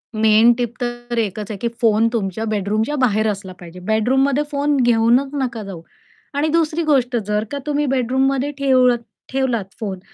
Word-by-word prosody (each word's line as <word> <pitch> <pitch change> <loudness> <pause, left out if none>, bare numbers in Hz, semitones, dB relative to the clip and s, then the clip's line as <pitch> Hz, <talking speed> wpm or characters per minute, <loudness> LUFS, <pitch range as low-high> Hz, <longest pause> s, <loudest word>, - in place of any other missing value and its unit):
Main 220 +2 +5
tip 240 -2 -2
तर 240 0 -4
एकच 210 -1 -3
आहे, 205 - -5
की 235 - -2
फोन 225 0 +3
तुमच्या 220 -1 -2
बेडरूमच्या 215 +6 -1
बाहेर 215 -2 +2
असला 195 -2 -7
पाहिजे. 175 0 -11
बेडरूममध्ये 255 +8 +1
फोन 285 +1 +1
घेऊनच 240 +2 +3
नका 235 -4 -3
जाऊ. 190 -5 -8 0.5
आणि 285 +2 0
दुसरी 325 0 +1
गोष्ट, 260 -5 +1
जर 210 0 0
का 285 - -3
तुम्ही 295 0 0
बेडरूममध्ये 270 +2 0
ठेव 260 -2 +4 0.4
ठेवलात 255 -6 0
फोन 195 -4 -4
240 Hz, 160 wpm, -19 LUFS, 215-270 Hz, 0.5 s, Main